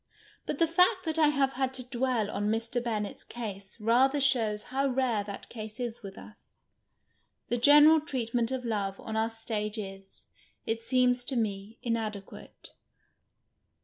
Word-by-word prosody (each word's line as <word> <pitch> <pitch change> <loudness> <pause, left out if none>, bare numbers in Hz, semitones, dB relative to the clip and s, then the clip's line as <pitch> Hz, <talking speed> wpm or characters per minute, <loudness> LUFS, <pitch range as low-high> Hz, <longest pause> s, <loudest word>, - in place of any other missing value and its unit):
IJiit - - -2
the 330 - +4
fact 360 +3 +3
that 320 0 -1
I 310 - +6
have 275 -2 +1
had 265 0 -1
to 255 -1 -4
dwell 245 -4 0
on 205 - -2
Mr. 230 +2 -1
Bennett's 215 -4 -3
case 200 -3 -7
rather 255 +6 +3
shows 230 -6 +2
how 275 +1 +2
rare 250 -5 0
that 200 -1 -8
case 215 0 -8
is 240 -2 -4
with 195 -3 -9
us. 210 - -15 1.0
The 240 - +1
general 295 +4 +7
treatment 240 -6 -1
of 260 -1 -3
love 200 -4 -2
on 220 - -6
our 220 +1 +1
ktagc 220 -1 -4
is, 195 -2 -9 0.4
it 225 0 -2
seems 250 0 +2
to 270 - -2
me, 210 -1 -2
inadeipiate. 215 -4 -5
235 Hz, 155 wpm, -29 LUFS, 215-265 Hz, 1.0 s, general